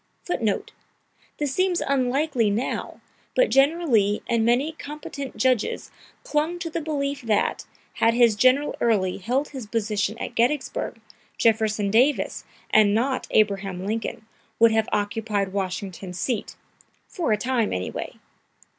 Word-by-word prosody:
[Footnote: 220 Hz, -, -1 dB, 0.7 s
This 290 Hz, -2 st, -1 dB
seems 370 Hz, 0 st, +1 dB
unlikely 265 Hz, -2 st, +1 dB
now, 220 Hz, +6 st, -3 dB, 0.3 s
but -, -, +3 dB
General 315 Hz, +6 st, +3 dB
Lee 210 Hz, -5 st, +2 dB
and 230 Hz, -1 st, +1 dB
many 245 Hz, +7 st, +2 dB
competent 290 Hz, -4 st, -7 dB
judges 250 Hz, 0 st, 0 dB, 0.3 s
clung 310 Hz, +4 st, 0 dB
to 345 Hz, -2 st, -5 dB
the 335 Hz, -, -2 dB
belief 280 Hz, -2 st, -2 dB
that, 220 Hz, -4 st, 0 dB, 0.3 s
had 230 Hz, 0 st, +2 dB
his 235 Hz, -3 st, +5 dB
General 255 Hz, +6 st, +3 dB
Early 195 Hz, -6 st, +2 dB
held 255 Hz, +9 st, -1 dB
his 260 Hz, -6 st, -7 dB
position 215 Hz, -1 st, -1 dB
at -, -, -5 dB
Gettysburg, 245 Hz, -1 st, 0 dB, 0.4 s
Jefferson 215 Hz, -2 st, +2 dB
Davis, 255 Hz, +7 st, +2 dB, 0.3 s
and 210 Hz, -1 st, +5 dB
not 255 Hz, +4 st, 0 dB
Abraham 195 Hz, -3 st, +1 dB
Lincoln, 220 Hz, +1 st, -3 dB, 0.3 s
would 230 Hz, 0 st, +6 dB
have 220 Hz, 0 st, +1 dB
occupied 205 Hz, -1 st, -1 dB
Washington's 185 Hz, -1 st, -4 dB
seat 235 Hz, -6 st, -2 dB, 0.5 s
for 340 Hz, -, -2 dB
a 210 Hz, -, +3 dB
time, 240 Hz, -1 st, 0 dB
anyway! 90 Hz, 0 st, -4 dB
230 Hz, 130 wpm, -24 LUFS, 210-280 Hz, 0.7 s, would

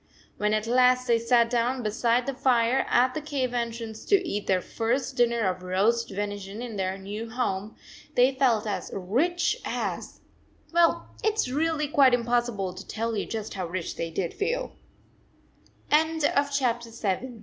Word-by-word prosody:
When 210 Hz, 0 st, +1 dB
at 215 Hz, 0 st, -1 dB
last 250 Hz, +1 st, +4 dB
they 235 Hz, -2 st, +3 dB
sat 235 Hz, 0 st, +3 dB
down 245 Hz, +1 st, 0 dB
beside 235 Hz, +3 st, +1 dB
the 275 Hz, -, -2 dB
fire 250 Hz, -1 st, +2 dB
at 255 Hz, +1 st, +3 dB
the 310 Hz, -, -3 dB
cave 270 Hz, -4 st, -2 dB
entrance 230 Hz, -2 st, -4 dB
to 385 Hz, -3 st, +3 dB
eat 205 Hz, -6 st, -3 dB
their 190 Hz, -1 st, +3 dB
first 245 Hz, +7 st, -2 dB
dinner 235 Hz, -1 st, +2 dB
of 185 Hz, -3 st, 0 dB
roast 200 Hz, +6 st, +1 dB
venison 205 Hz, 0 st, -5 dB
in 235 Hz, -3 st, -6 dB
their 190 Hz, -1 st, -2 dB
new 205 Hz, +4 st, -6 dB
home, 215 Hz, -4 st, -2 dB, 0.4 s
they 250 Hz, +2 st, +5 dB
felt 250 Hz, -5 st, +2 dB
as 210 Hz, -, -3 dB
rich 320 Hz, -, +1 dB
as -, -, -4 dB, 0.5 s
well 340 Hz, -1 st, +3 dB, 0.2 s
it 435 Hz, -, +3 dB
s 430 Hz, -12 st, 0 dB
really 305 Hz, +2 st, 0 dB
quite 275 Hz, -3 st, +5 dB
impossible 235 Hz, -5 st, -1 dB
to -, -, -10 dB
tell 225 Hz, +1 st, -2 dB
you -, -, -2 dB
just 220 Hz, -2 st, -5 dB
how 185 Hz, -3 st, -3 dB
rich 170 Hz, 0 st, -4 dB
they 165 Hz, -, -3 dB
did 170 Hz, +1 st, -3 dB
f 480 Hz, +4 st, 0 dB
235 Hz, 155 wpm, -26 LUFS, 205-255 Hz, 0.5 s, they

